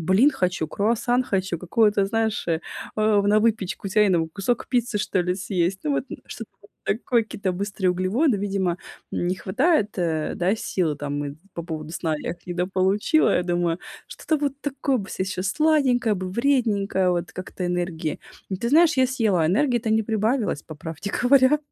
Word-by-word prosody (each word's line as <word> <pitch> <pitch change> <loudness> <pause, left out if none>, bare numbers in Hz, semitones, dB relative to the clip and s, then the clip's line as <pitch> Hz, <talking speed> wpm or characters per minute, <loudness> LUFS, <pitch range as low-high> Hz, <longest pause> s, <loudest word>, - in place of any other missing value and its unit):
блин 190 - +4
хочу, 180 - -1
круассан 235 +6 +1
хочу, 190 -6 -1
какую-то, 200 +3 +2
знаешь, 220 0 -1
э, 160 -1 +1 0.4
на 210 -1 +3
выпечку 210 -3 -1
тяйную. 190 -5 +3
Кусок 230 +6 -1
пиццы, 240 -3 0
что 200 -2 0
ли, 180 0 0
съесть". 185 0 -1
Ну, 300 - 0
вот, 275 - 0
м, - - -5
что-то 225 - -8 0.3
такое, 230 +3 +1
какие-то 200 -3 -3
быстрые 195 0 -1
углеводы, 205 - +1
видимо, 195 -2 0 0.4
м, - - -1
не 180 - +1
хватает, 235 - +1
э, 160 -3 -1
да, 185 +4 +1
сил, 170 -8 -1
там, 145 0 -3
и 140 +1 -6 0.2
по 170 - -5
поводу 155 -2 -6
сна 160 -2 -1
я - - -4
их 170 0 -10
недополучила, 190 - +2
я 180 - +1
думаю: 175 -1 0 0.3
"Что-то 315 - -2
вот 285 -1 -2
такое 275 -1 -1
бы 200 -5 -5
сейчас, 185 0 -2
сладенькое 275 -7 +2
бы, 185 -1 -4
вредненькое, 210 -6 +1
вот, 175 -2 -2
как-то 185 0 -5
энергии". 175 -3 -2 0.4
Ты 235 - 0
знаешь, 325 +2 +5
я 260 -1 +4
съела, 220 -10 +1
энергии-то 235 - +1
не 220 0 +3
прибавилось, 220 - 0
по 155 - -10
правде 160 +6 -6
говоря. 260 +3 +5
200 Hz, 170 wpm, -24 LUFS, 180-235 Hz, 0.4 s, знаешь